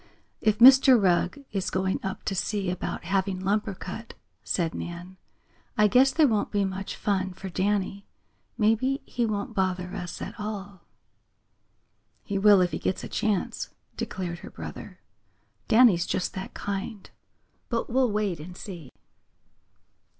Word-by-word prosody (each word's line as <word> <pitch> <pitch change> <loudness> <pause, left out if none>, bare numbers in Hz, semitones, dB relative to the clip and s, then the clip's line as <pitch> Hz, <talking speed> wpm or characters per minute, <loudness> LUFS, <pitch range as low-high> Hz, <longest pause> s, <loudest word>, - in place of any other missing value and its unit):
"If 215 -1 +2
Mr. 260 +1 +8
Rugg 185 +8 +1
is 195 -3 -1
going 190 0 0
up 190 0 -5
to - - -1
see 195 0 -1
about 180 - -4
having 190 +1 0
lumber 200 +1 0
cut," 210 +6 -8 0.3
said 170 -3 -1
Nan, 175 +2 -7 0.6
"I 210 0 +6
guess 255 +6 +5
there 310 0 +4
won't 215 -4 0
be 205 -1 +1
much 190 0 -4
fun 190 -2 -1
for 190 +1 -7
Danny. 195 +1 -1 0.5
Maybe 230 +5 +2
he 240 -2 -1
won't 210 +1 -3
bother 185 -2 -1
us 180 -3 -5
at - - -7
all." 200 -3 -6 1.4
"He 200 -1 -2
will 205 -1 +7
if 180 -1 +1
he 155 - -3
gets 185 - -2
a - - -4
chance," 205 -4 -1 0.3
declared 175 -2 -4
her - - -10
brother. - - -9 0.7
"Danny's 220 -7 +5
just 185 - -1
that 190 - -7
kind. 200 +1 -4 0.6
But 230 -1 -1
we'll 255 -1 +2
wait 205 -5 -1
and 175 +4 -9
see." 170 -9 -9
195 Hz, 145 wpm, -27 LUFS, 185-215 Hz, 1.4 s, Mr